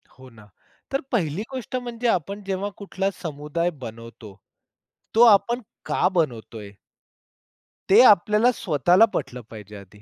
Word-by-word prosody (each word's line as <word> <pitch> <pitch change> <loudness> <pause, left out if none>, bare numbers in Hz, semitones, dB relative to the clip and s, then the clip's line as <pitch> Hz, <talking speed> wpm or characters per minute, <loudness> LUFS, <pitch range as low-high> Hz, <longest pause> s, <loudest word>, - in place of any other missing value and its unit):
हो 130 0 -16
ना, 110 -3 -18 0.4
तर 275 - -1
पहिली 175 - -1
गोष्ट 255 -1 -6
म्हणजे 245 -1 -3
आपण 200 0 -1
जेव्हा 195 +1 -2
कुठला 195 -1 -3
समुदाय 155 +1 -3
बनवतो, 115 -3 -10 0.8
तो 230 - +6
आपण 235 +2 +4 0.2
का - - +1
बनवत 150 - -2
आहे. 105 -2 -9 1.2
ते 205 +5 +7
आपल्याला 210 +3 +4
स्वतःला 175 - +3
पटलं 125 0 -4
पाहिजे 105 -2 -11
आधी, 100 +1 -16
175 Hz, 130 wpm, -23 LUFS, -, 1.2 s, ते